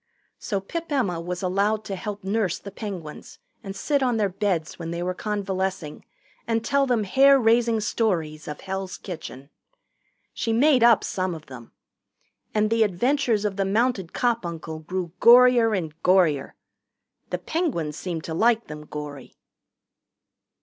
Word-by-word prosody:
So 200 -5 -2
Pip 330 - -6
Emma 200 -12 0
was 180 +2 -5
allowed 200 +4 +1
to 195 - -4
help 205 +1 -6
nurse 195 -2 0
the 200 - -10
Penguins 190 -7 -8 0.3
and 195 -2 -7
sit 285 +8 0
on 250 -3 +1
their 205 -2 +1
beds 180 -6 -2
when 165 -1 -5
they 170 +1 -3
were 180 +1 -1
convalescing 190 -5 -3 0.4
and 225 -1 0
tell 280 -1 +2
them 240 -4 +1
hair 275 +7 +5
raising 230 -1 +3
stories 170 -9 -1
of 150 - -6
Hell's 190 -1 -5
Kitchen. 145 -6 -9 0.8
She 225 - -1
made 265 +2 +4
up 235 -2 +6
some 185 -2 -2
of 155 -1 -11
them. 125 -3 -12 0.8
And 215 0 +1
the 230 0 +2
adventures 220 +2 +1
of 200 -1 -2
the 195 - +1
mounted 210 -3 0
cop 235 -3 0
uncle 160 -2 -6
grew 175 +1 -4
gorier 240 -2 +6
and 160 -4 -4
gorier. 170 -7 +3 0.8
The - - -1
Penguins 240 - -2
seemed 165 -2 -5
to 160 - -5
like 225 +6 +2
them 150 0 -9
gory. 145 -3 -8
195 Hz, 155 wpm, -24 LUFS, 170-230 Hz, 0.8 s, up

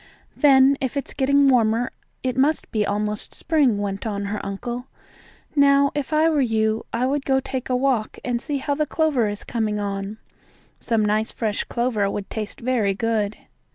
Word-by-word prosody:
"Then 275 -1 +5
if 265 +1 -2
it's 280 - -3
getting 280 +1 +3
warmer 235 -1 +3 0.3
it 255 -1 -1
must 280 +4 +1
be 215 -2 +1
almost 210 +1 -3
spring," 290 -9 +2
went 200 +1 -3
on 200 -1 -3
her 205 +1 -4
uncle. 240 +6 -5 0.7
"Now, 280 -1 +5
if 290 -1 -3
I 310 +1 +4
were 310 -3 +2
you, 220 -2 0
I 240 +2 0
would 275 +2 0
go 265 -1 +2
take 265 -1 -5
a 255 - +2
walk 250 -4 0
and 240 -1 -1
see 290 -1 -2
how 285 +1 -1
the 305 +1 -1
clover 285 -10 +1
is 205 0 -6
coming 215 -3 -2
on. 200 +1 -4 0.6
Some 225 -3 +1
nice, 215 +2 +1
fresh 215 -2 -2
clover 235 -5 0
would 200 0 -5
taste 215 -1 -5
very 230 -5 +1
good." 215 -1 -1
240 Hz, 180 wpm, -23 LUFS, 210-275 Hz, 0.7 s, Then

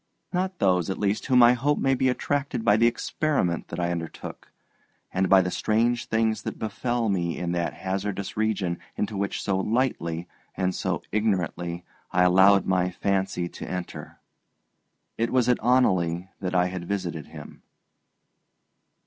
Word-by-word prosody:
Not 185 +1 -1
those, 90 -3 +2
at 95 - -2
least, 100 0 -1
whom 125 -2 +6
I 120 +1 +7
hope 140 +4 +1
may 135 - +2
be 130 0 +2
attracted 140 -2 -1
by 105 -2 +6
the 115 +2 +4
experiment 120 - -1
that 85 - -6
I 85 0 0
undertook, 85 -1 -6 0.6
and 95 +1 +1
by 95 -1 +7
the 90 - -2
strange 115 +5 +1
things 110 0 +1
that - - -5
befell 115 +2 -1
me 85 -4 -1
in 85 -1 -2
that 85 -1 -1
hazardous 95 +1 -3
region 100 -5 -1 0.2
into 105 0 -2
which 100 0 -2
so 95 -1 0
lightly 95 -7 -1 0.3
and 95 0 0
so - - -2
ignorantly 90 -4 -1 0.3
I 90 - +3
allowed 95 +2 +5
my 90 -1 +1
fancy 95 -1 -1
to - - -8
enter. 90 -1 -6 1.0
It 115 - +1
was 125 -2 +2
at 125 - +2
Oneleigh 95 -8 +2
that 90 -1 -3
I 90 0 +4
had 90 -1 -5
visited 90 -7 -3
him. - - -11
100 Hz, 155 wpm, -26 LUFS, 90-115 Hz, 1.0 s, I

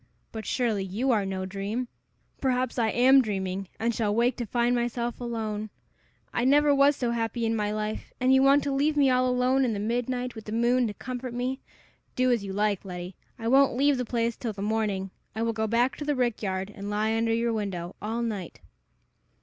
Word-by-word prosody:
But, 220 -2 -6
surely, 225 -6 0
you 215 +8 -1
are 210 -4 +1
no 190 -1 -3
dream! 200 +6 -3 0.5
Perhaps 255 -2 0
I 225 -1 +2
am 260 +4 +6
dreaming, 195 -3 -3
and 235 +1 +1
shall 210 -3 0
wake 240 +2 +2
to 240 - -4
find 240 +2 +1
myself 240 0 -2
alone! 215 -3 -3 0.6
I 240 - 0
never 290 +3 +5
was 280 +1 +5
so 245 -3 -1
happy 230 0 -1
in 225 0 +1
my 210 -1 0
life, 215 0 -4
and 255 +1 +4
you 265 - +6
want 275 +1 +5
to 280 - -1
leave 295 +2 +1
me 275 -2 +5
all 255 0 +3
alone 250 +2 +2
in 240 -3 +1
the 205 - -3
midnight, 245 +3 -2
with 220 - -10
the 210 - -6
moon 240 +2 +2
to 210 - -5
comfort 255 -1 -6
me! 255 +2 -2 0.6
Do 255 0 +3
as 235 -4 +1
you 195 - -5
like, 205 0 0
Letty! 180 -1 -7 0.2
I 225 - -4
won't 270 0 +4
leave 280 0 +3
the - - 0
place 235 -1 -1
till 230 -3 -4
the 200 0 -6
morning. 205 -3 -1 0.2
I 225 - -1
will 230 0 0
go 220 0 -1
back 240 +4 +2
to - - -5
the 295 0 0
rick 245 -3 0
yard, 190 -1 -2
and 200 +1 -6
lie 215 +2 0
under 225 0 +1
your 230 +1 +1
window 190 -5 -4
all 225 +3 -2
night." 205 -7 -4
230 Hz, 215 wpm, -27 LUFS, 210-250 Hz, 0.6 s, am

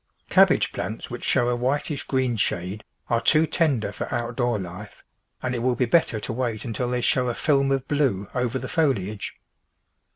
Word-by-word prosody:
Cabbage - - +5
plants - - -5
which - - -6
show 120 - +2
a 125 - +1
whitish 140 +4 -1
green 130 -3 +1
shade 95 0 -2 0.2
are 115 -1 +1
too 155 +7 +4
tender 145 -9 +1
for - - -5
outdoor 120 0 0
life, 90 -2 -8 0.4
and 130 - -1
it 120 - -1
will 125 +1 +1
be 125 - +1
better 120 -3 +2
to 115 - -3
wait 115 -3 -2
until 120 +1 -2
they 125 0 0
show 125 +1 +2
a 120 - -2
film 140 -2 +2
of 135 -1 0
blue 130 -10 +1
over 125 0 0
the 130 - -5
foli 135 - +1
age. 105 - -7
125 Hz, 190 wpm, -24 LUFS, 115-135 Hz, 0.4 s, Cabbage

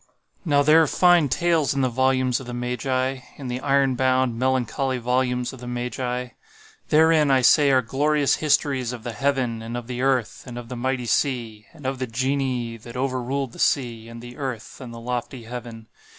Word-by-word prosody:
Now 145 -5 +3
there 155 +3 +6
are 160 - +3
fine 175 -2 +4
tales 160 0 +1
in 135 - +1
the 130 - +3
volumes 130 0 +1
of 130 - -10
the 120 - -5
Magi—in 130 +2 -3
the 125 +1 -3
iron 135 -1 +2
bound, 130 -2 +1
melancholy 130 +1 0
volumes 125 +1 0
of 130 - -11
the 125 - -9
Magi. 125 +1 -3 0.6
Therein, 155 -1 +4
I 135 -1 +4
say, 140 +3 +5
are 130 -2 +4
glorious 145 +4 +1
histories 140 -4 +1
of 120 -3 -8
the 120 - -4
Heaven, 125 -2 -1
and 115 +2 -5
of 120 - -6
the 125 0 -5
Earth, 130 -4 0
and 120 -1 -7
of 120 -1 -8
the 125 - -5
mighty 125 +1 -2
sea—and 120 0 -2
of 130 0 -2
the 130 - -2
Genii 125 -1 -1
that 120 +2 -10
over 130 -1 -1
ruled 135 +1 -2
the - - -13
sea, 115 -4 0
and 115 0 -10
the 120 0 -10
earth, 130 -3 -6
and 125 -2 -8
the 115 - -9
lofty 120 +1 -4
heaven. 115 -1 -8
130 Hz, 195 wpm, -23 LUFS, 120-135 Hz, 0.6 s, there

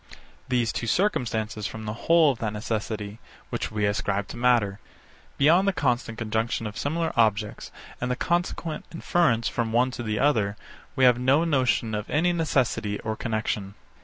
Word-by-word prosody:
These 120 -3 +1
two 115 - -3
circumstances 110 - 0
form 110 +3 -8
the 105 - -3
whole 160 +5 +4
of 125 - -7
that 110 -2 -2
necessity, 105 -1 -4 0.3
which - - -2
we 105 -1 0
ascribe 100 -1 -1
to - - -7
matter. 120 -5 +2 0.6
Beyond 170 +7 +4
the 195 - +3
constant 120 -7 -1
conjunction 110 0 -1
of 105 0 -5
similar 160 +5 -1
objects, 110 -2 +1 0.3
and 120 - -1
the 125 - 0
consequent 170 0 -2
inference 165 -8 +1
from 115 -2 -1
one 125 +3 +2
to 120 - -6
the 110 -2 -2
other, 110 -7 +2 0.4
we 130 - +1
have 125 -1 +6
no 135 +5 +3
notion 130 -7 +1
of 105 0 -3
any 175 +4 +2
necessity 125 -10 0
or 110 -1 -3
connexion. 110 -3 -3
115 Hz, 165 wpm, -26 LUFS, 110-140 Hz, 0.6 s, have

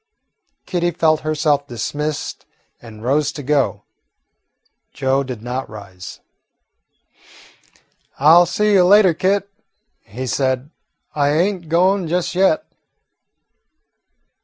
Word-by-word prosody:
Kitty 175 -2 -1
felt 160 -2 +1
herself 150 -2 0
dismissed 145 +5 -4 0.3
and 110 -2 -12
rose 145 +3 +1
to 145 - -7
go. 125 -8 0 1.1
Joe 135 0 0
did 125 -5 -7
not 125 +2 -4
rise. 100 -3 -11 2.0
"I 150 +4 +5
'll 175 +1 +6
see 210 +4 +1
you 190 -2 +5
later, 190 -1 +5
Kit," 195 +4 0 0.6
he 125 +6 -7
said; 130 +2 -1 0.4
"I 145 -1 +1
ain't 175 0 -1
goin' 185 +2 +2
just 175 +1 -1
yet. 195 - +2
150 Hz, 105 wpm, -19 LUFS, 130-175 Hz, 2.0 s, ll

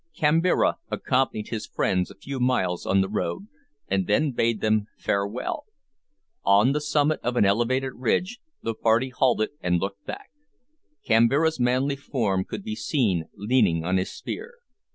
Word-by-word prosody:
Kambira 165 +4 +3
accompanied 125 -5 0
his 110 -2 -4
friends 90 -1 0
a - - -12
few 135 +6 -6
miles 110 -9 0
on 95 +1 +3
the 95 - 0
road, 105 - -3 0.4
and 95 -1 0
then 145 +8 +2
bade 115 -2 0
them 110 -1 +1
farewell. 105 - -2 0.8
On 100 +6 +5
the 150 +1 0
summit 150 +1 +1
of 120 +1 -2
an 110 - +4
elevated 125 +6 +1
ridge 180 - -1 0.2
the 115 - -1
party 115 +3 +2
halted 125 -4 +1
and 90 -1 +1
looked 100 +2 -4
back. 405 0 -7 0.7
Kambira's 130 +7 +3
manly 130 +3 +1
form 105 -9 -1
could - - -6
be 220 0 -4
seen 105 - 0
leaning 105 -7 +2
on 95 +2 +1
his 95 - -1
spear. 475 +3 -7
120 Hz, 155 wpm, -25 LUFS, 100-140 Hz, 0.8 s, On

